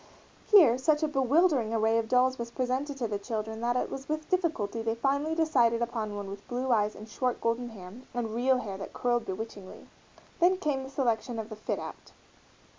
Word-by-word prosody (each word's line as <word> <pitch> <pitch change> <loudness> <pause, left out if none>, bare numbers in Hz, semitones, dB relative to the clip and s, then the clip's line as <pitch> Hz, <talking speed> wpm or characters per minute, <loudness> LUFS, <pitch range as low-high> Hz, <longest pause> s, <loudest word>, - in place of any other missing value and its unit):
Here 310 - +7
such 300 +3 +2
a - - +3
bewildering 275 -4 +2
array 225 +1 +3
of 225 - -2
dolls 255 0 +3
was 235 0 -4
presented 260 +3 -2
to 240 -3 -1
the 205 -2 -3
children 220 +1 -4
that 240 +1 +1
it 250 - -1
was 270 +1 -7
with 310 0 -3
difficulty 320 - 0
they 225 0 -1
finally 280 +6 0
decided 250 -8 +3
upon 230 -3 -2
one 205 -1 -5
with 200 +1 -9
blue 250 +1 -2
eyes 210 -2 +2
and 215 - -10
short 250 +2 -1
golden 230 +1 -1
hair, 185 -4 -10 0.2
and 235 -3 -3
real 255 +3 +3
hair 200 -6 -5
that - - -7
curled 240 -1 0
bewitchingly. 195 0 -7 0.5
Then 365 +2 +4
came 295 -7 -1
the 265 - -7
selection 240 -3 -1
of 220 0 -5
the 215 - -6
"fit 215 - -3
out." - - -9
240 Hz, 200 wpm, -29 LUFS, 220-270 Hz, 0.5 s, Here